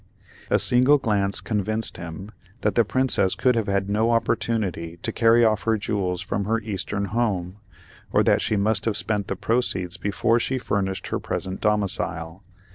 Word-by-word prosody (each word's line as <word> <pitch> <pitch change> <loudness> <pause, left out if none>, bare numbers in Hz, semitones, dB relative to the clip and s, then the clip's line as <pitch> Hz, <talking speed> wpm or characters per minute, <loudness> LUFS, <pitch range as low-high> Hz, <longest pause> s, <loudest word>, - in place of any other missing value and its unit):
A - - +4
single 130 +4 +5
glance 100 -6 0
convinced 110 +1 -2
him 85 +4 -8 0.3
that 105 - +1
the 115 - +4
Princess 120 -4 +2
could 125 - +2
have 115 -3 -1
had 100 -1 0
no 110 +3 +1
opportunity 110 -7 -1
to - - -1
carry 115 0 +4
off 110 -1 +2
her 115 -1 +2
jewels 95 -3 -2
from 100 0 -2
her 115 +2 +1
eastern 100 -1 -3
home, 100 -3 -2 0.5
or - - +3
that - - +3
she - - 0
must 105 +1 +1
have 110 -3 +1
spent 105 -3 -1
the 95 - -2
proceeds 95 -5 -1
before 105 +5 +1
she 130 +3 -1
furnished 95 -6 -2
her - - -1
present 95 0 -4
domicile. 95 -4 -1
105 Hz, 170 wpm, -24 LUFS, 95-115 Hz, 0.5 s, single